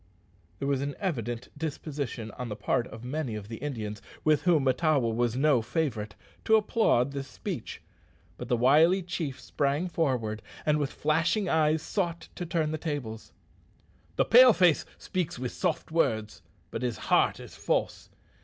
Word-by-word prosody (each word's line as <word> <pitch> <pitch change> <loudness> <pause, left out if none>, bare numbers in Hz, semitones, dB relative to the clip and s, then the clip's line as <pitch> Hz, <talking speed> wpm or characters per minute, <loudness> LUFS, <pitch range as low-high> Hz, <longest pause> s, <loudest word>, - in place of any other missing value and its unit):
There 140 - -3
was 140 -1 +1
an 140 0 -3
evident 120 - -3
disposition 140 -6 -4
on 125 +3 -6
the 105 - -4
part 125 +3 0
of 110 +1 -10
many 130 -2 -3
of 105 -1 -7
the 115 - -6
Indians, 110 -7 -5 0.2
with 155 -1 +3
whom 170 -6 +3
Mahtawa 135 -2 +2
was 120 0 0
no 135 -2 +3
favourite, 110 -5 -2 0.3
to 220 - +5
applaud 210 - +2
this 140 -1 -5
speech; - - -6 0.5
but 125 - -7
the 120 -1 +1
wily 155 +10 +5
chief 165 -6 -4
sprang 145 +5 -1
forward, 125 -11 -1 0.2
and, 150 0 +3
with 145 -2 -1
flashing 165 +7 +1
eyes, 155 -1 +2
sought 170 -4 -2
to 175 - -5
turn 160 -2 0
the 155 - -3
tables. 135 -9 -5 0.8
"The - - +2
Pale 250 0 +8
face 175 -5 +3
speaks 180 -7 -3
with 125 0 -3
soft 175 -3 -2
words, 110 -10 0 0.3
but - - -4
his 125 -3 -2 0.2
heart - - +4
is - - -11
false. - - -1
145 Hz, 165 wpm, -28 LUFS, 120-160 Hz, 0.8 s, Pale